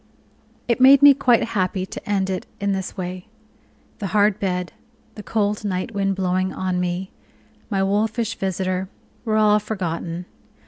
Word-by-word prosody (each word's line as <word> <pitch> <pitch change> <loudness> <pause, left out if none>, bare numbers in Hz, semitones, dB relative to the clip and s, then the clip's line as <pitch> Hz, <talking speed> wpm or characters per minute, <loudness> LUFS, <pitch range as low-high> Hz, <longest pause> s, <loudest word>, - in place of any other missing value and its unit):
It 240 +1 +1
made 270 +2 +8
me 285 0 +10
quite 250 -3 +3
happy 190 -4 -1
to 190 - -9
end 195 -2 0
it 185 - -4
in 200 -1 0
this 190 0 -4
way. 180 0 -5 0.7
The 200 - -3
hard 205 0 +2
bed, 180 -2 -2 0.4
the 210 - -9
cold 210 -1 -1
night 190 +2 -3
wind 195 -1 0
blowing 185 0 0
on 185 -1 -2
me, 180 +1 -3 0.6
my 195 -3 0
wolfish 215 +3 0
visitor, 185 0 -2 0.4
were 215 -1 +1
all 210 -1 +4
forgotten. 175 -4 -4
195 Hz, 150 wpm, -22 LUFS, 185-210 Hz, 0.7 s, me